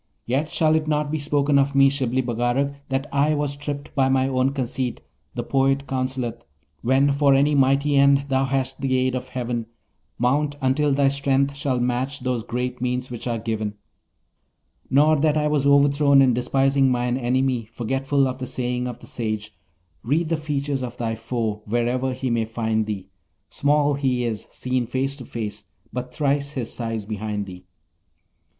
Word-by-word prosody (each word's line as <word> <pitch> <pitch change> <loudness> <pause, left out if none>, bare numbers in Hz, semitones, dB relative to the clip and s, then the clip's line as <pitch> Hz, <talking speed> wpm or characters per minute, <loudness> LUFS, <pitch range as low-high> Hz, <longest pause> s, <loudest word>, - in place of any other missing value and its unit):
Yet 140 +6 0
shall 155 -1 +2
it 155 -1 +1
not 150 -1 0
be 155 - -1
spoken 145 -1 +2
of 140 0 +1
me, 135 0 +7
Shibli 130 -2 0
Bagarag, 120 +4 0 0.2
that 135 +1 -1
I 145 +2 +3
was 145 -1 -1
tripped 145 0 -6
by 135 -1 +2
my 130 0 +2
own 130 0 +1
conceit; 130 -2 -3 0.4
the - - -2
poet 135 0 +1
counselleth: 130 -3 -3 0.4
"When 135 +3 +3
for 140 -1 +4
any 145 +2 +3
mighty 140 +1 +3
end 140 0 +5
thou 135 0 +1
hast 135 0 -2
the 130 -1 +1
aid 130 0 +1
of 130 0 -4
heaven, 120 -3 -3 0.5
Mount 145 +4 +1
until 140 +2 +2
thy 140 0 +3
strength 140 0 +1
shall 140 -3 -1
match 125 +3 -1
those 125 -2 -1
great 125 +2 -4
means 125 0 -2
which 120 0 -6
are 120 -1 -1
given": 110 -2 -3 1.1
nor 150 +3 +4
that 155 +1 +2
I 150 0 +2
was 145 -2 +1
overthrown 140 0 +5
in 130 -2 +4
despising 135 +2 +2
mine 125 -1 0
enemy, 130 -1 0
forgetful 135 +4 0
of 130 0 -4
the 130 - -4
saying 125 -1 -2
of 120 -1 -5
the - - -14
sage: 110 -2 -4 0.5
"Read 155 +7 0
the 165 - +2
features 145 -2 -2
of 125 -1 -5
thy 115 -2 -2
foe, 115 -2 -3
wherever 120 +4 0
he 130 -1 -3
may 115 -1 +1
find 110 -1 -1
thee, 95 -3 -5 0.4
Small 145 0 +2
he 130 -3 0
is, 110 -3 -3
seen 125 -2 -2
face 135 +3 -1
to 125 - -9
face, 110 -3 -5 0.3
but 125 0 -4
thrice 140 +1 0
his 125 -5 -3
size 115 -3 -3
behind 105 -1 -3
thee." 90 -1 -11
130 Hz, 175 wpm, -23 LUFS, 120-140 Hz, 1.1 s, me